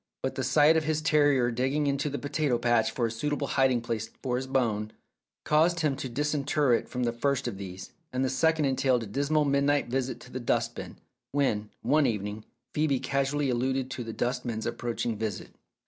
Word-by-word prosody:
But 130 Hz, -, -1 dB
the 130 Hz, -, -3 dB
sight 145 Hz, +5 st, +5 dB
of 160 Hz, -, 0 dB
his 155 Hz, 0 st, +1 dB
terrier 145 Hz, -6 st, +3 dB
digging 135 Hz, +5 st, 0 dB
in 140 Hz, -1 st, +2 dB
the 145 Hz, 0 st, -2 dB
potato 145 Hz, -3 st, 0 dB
patch 120 Hz, -2 st, +2 dB
for 120 Hz, -, -1 dB
a 115 Hz, -, -1 dB
suitable 145 Hz, +5 st, -2 dB
hiding 135 Hz, -3 st, +2 dB
place 115 Hz, -1 st, -3 dB
for 125 Hz, -2 st, 0 dB
his 130 Hz, +1 st, -2 dB
bone, 110 Hz, -5 st, 0 dB, 0.5 s
caused 165 Hz, +3 st, +3 dB
him 150 Hz, -3 st, +1 dB
to 130 Hz, -, -4 dB
disinter 145 Hz, 0 st, +1 dB
it 115 Hz, -, 0 dB
from 125 Hz, 0 st, -2 dB
the 120 Hz, -1 st, 0 dB
first 135 Hz, +2 st, 0 dB
of 100 Hz, -5 st, -5 dB
these, 95 Hz, -1 st, -8 dB, 0.2 s
and 130 Hz, +1 st, 0 dB
the -, -, 0 dB
second 160 Hz, +3 st, +2 dB
entailed 130 Hz, -2 st, +2 dB
a -, -, -5 dB
dismal 145 Hz, +8 st, +1 dB
midnight 140 Hz, -1 st, +2 dB
visit 130 Hz, +1 st, -2 dB
to 125 Hz, -, -13 dB
the 130 Hz, -, -4 dB
dust 120 Hz, -, 0 dB
bin, -, -, -8 dB, 0.4 s
when, 110 Hz, -7 st, +1 dB
one 150 Hz, -1 st, +3 dB
evening, 105 Hz, -1 st, -3 dB, 0.3 s
Phcebe 150 Hz, -4 st, +1 dB
casually 140 Hz, 0 st, 0 dB
alluded 130 Hz, +2 st, -1 dB
to 130 Hz, -2 st, -4 dB
the 115 Hz, -, -6 dB
dustman's 120 Hz, -2 st, -2 dB
approach 120 Hz, -1 st, -3 dB
ing 115 Hz, -3 st, -1 dB
visit. 110 Hz, -4 st, -4 dB
130 Hz, 200 wpm, -28 LUFS, 120-145 Hz, 0.5 s, sight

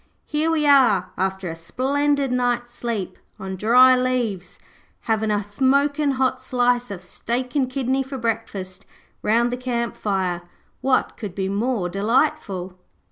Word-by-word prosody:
Here 305 Hz, +2 st, 0 dB
we 315 Hz, -2 st, +1 dB
are, 240 Hz, -11 st, +4 dB
after 190 Hz, 0 st, -2 dB
a 165 Hz, -, -4 dB
splendid 275 Hz, -, 0 dB
night's 245 Hz, -1 st, 0 dB
sleep 225 Hz, -6 st, -4 dB, 0.2 s
on 190 Hz, -2 st, -5 dB
dry 250 Hz, +6 st, +6 dB
leaves, 250 Hz, -7 st, -1 dB, 0.4 s
havin' 220 Hz, -1 st, 0 dB
a 205 Hz, -1 st, +1 dB
smokin' 280 Hz, +6 st, +1 dB
hot 260 Hz, 0 st, 0 dB
slice 245 Hz, -1 st, +1 dB
of 190 Hz, -3 st, -7 dB
steak 245 Hz, +7 st, -3 dB
and 265 Hz, -3 st, +2 dB
kidney 265 Hz, 0 st, 0 dB
for 270 Hz, 0 st, -5 dB
breakfast 195 Hz, -5 st, -4 dB, 0.3 s
round 235 Hz, +3 st, +2 dB
the 245 Hz, -, -2 dB
camp 240 Hz, -2 st, -2 dB
fire. 185 Hz, -4 st, -1 dB, 0.4 s
What 265 Hz, -1 st, +1 dB
could 205 Hz, -5 st, -6 dB
be 190 Hz, -1 st, -2 dB
more 210 Hz, -1 st, 0 dB
delightful?' 195 Hz, -, 0 dB
240 Hz, 140 wpm, -22 LUFS, 195-260 Hz, 0.4 s, dry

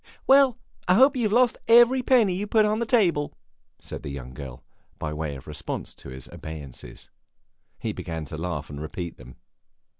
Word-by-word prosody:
"Well, 270 Hz, -3 st, +5 dB, 0.3 s
I 180 Hz, -, +5 dB
hope 265 Hz, +6 st, +6 dB
you 255 Hz, -, -1 dB
have 210 Hz, -, +1 dB
lost 245 Hz, +2 st, +3 dB
every 240 Hz, +3 st, +6 dB
penny 240 Hz, -7 st, +4 dB
you 200 Hz, +3 st, -3 dB
put 215 Hz, 0 st, +4 dB
on 215 Hz, +1 st, +1 dB
the 235 Hz, -, -1 dB
table!" 175 Hz, -, +2 dB, 0.4 s
said -, -, -7 dB
the -, -, -6 dB
young 65 Hz, -2 st, -7 dB
girl, 65 Hz, -3 st, -9 dB, 0.3 s
by 75 Hz, 0 st, -4 dB
way 75 Hz, -2 st, -4 dB
of 65 Hz, -, -11 dB
response -, -, -5 dB
to -, -, -11 dB
his 65 Hz, 0 st, -9 dB
obeisances. 70 Hz, -6 st, -9 dB, 0.7 s
He -, -, -3 dB
began 80 Hz, -2 st, -5 dB
to 75 Hz, -, -7 dB
laugh 80 Hz, -4 st, -4 dB
and 70 Hz, 0 st, -7 dB
repeat 85 Hz, +2 st, -6 dB
them. 65 Hz, -1 st, -13 dB
90 Hz, 185 wpm, -25 LUFS, -, 0.7 s, hope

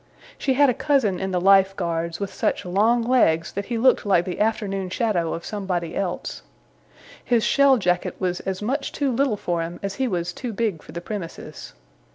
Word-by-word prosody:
She 265 Hz, -2 st, 0 dB
had 285 Hz, +1 st, +5 dB
a 250 Hz, -, +3 dB
cousin 240 Hz, -10 st, +1 dB
in 190 Hz, -, -2 dB
the 180 Hz, -1 st, 0 dB
Life 195 Hz, +1 st, +5 dB
Guards, 170 Hz, -2 st, -2 dB
with 200 Hz, -1 st, -4 dB
such -, -, -1 dB
long 220 Hz, +6 st, +2 dB
legs 170 Hz, -10 st, +2 dB
that 200 Hz, +1 st, -4 dB
he 235 Hz, -, -3 dB
looked 255 Hz, +3 st, +4 dB
like 185 Hz, -4 st, +2 dB
the 180 Hz, -, -5 dB
afternoon 200 Hz, -3 st, -1 dB
shadow 180 Hz, -5 st, 0 dB
of 170 Hz, -, -8 dB
somebody 185 Hz, -5 st, -3 dB
else. 185 Hz, -3 st, -3 dB, 0.8 s
His 235 Hz, -3 st, +2 dB
shell 280 Hz, -2 st, +5 dB
jacket 180 Hz, -4 st, 0 dB
was 180 Hz, -1 st, -1 dB
as 190 Hz, +1 st, -4 dB
much 275 Hz, +5 st, -2 dB
too 280 Hz, -2 st, -1 dB
little 250 Hz, -3 st, +1 dB
for 175 Hz, -3 st, -2 dB
him 170 Hz, +1 st, -5 dB
as 200 Hz, 0 st, -2 dB
he 260 Hz, -, +2 dB
was 175 Hz, -4 st, -2 dB
too 245 Hz, +2 st, -5 dB
big 205 Hz, -7 st, -1 dB
for -, -, -13 dB
the 170 Hz, -, -6 dB
premises. 190 Hz, -3 st, -7 dB
195 Hz, 200 wpm, -23 LUFS, 175-235 Hz, 0.8 s, had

